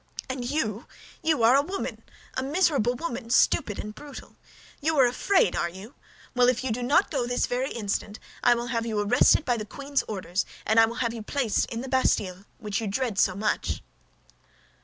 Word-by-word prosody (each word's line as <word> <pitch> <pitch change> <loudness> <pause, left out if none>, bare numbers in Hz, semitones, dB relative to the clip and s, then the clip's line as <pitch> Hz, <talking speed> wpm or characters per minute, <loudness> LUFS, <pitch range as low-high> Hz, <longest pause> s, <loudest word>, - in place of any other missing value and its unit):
"And 260 -1 -4
you, 230 -7 -2 0.3
you 315 -7 +1
are 235 +3 +6
a 280 - +5
woman—a 360 -5 -6
miserable 280 - +1
woman, 245 -5 -5
stupid 210 -3 +3
and 210 - -6
brutal. 285 +3 -11 0.5
You 315 +1 +1
are 265 - +7
afraid, 245 - +2
are 170 - 0
you? 190 +8 -11 0.4
Well, 250 -1 +4
if 255 0 0
you 260 - -1
do 240 +3 -2
not 285 +10 +3
go 260 -6 -1
this 245 0 +1
very 255 +2 -1
instant, 205 -1 -3 0.2
I 240 - +5
will 235 0 -3
have 230 0 -1
you 215 -2 -1
arrested 205 +8 +4
by 245 -2 +1
the 215 - -3
queen's 280 +5 -2
orders, 190 -3 -2 0.2
and 220 +1 +4
I 225 - +7
will 230 - -6
have 230 - -1
you 230 - -6
placed 235 -1 0
in 230 0 -5
the 265 - -6
Bastille 200 -8 0
which 210 -2 -3
you 220 - -3
dread 210 0 -1
so 185 - +3
much." 210 +2 -1
240 Hz, 195 wpm, -26 LUFS, 215-270 Hz, 0.5 s, are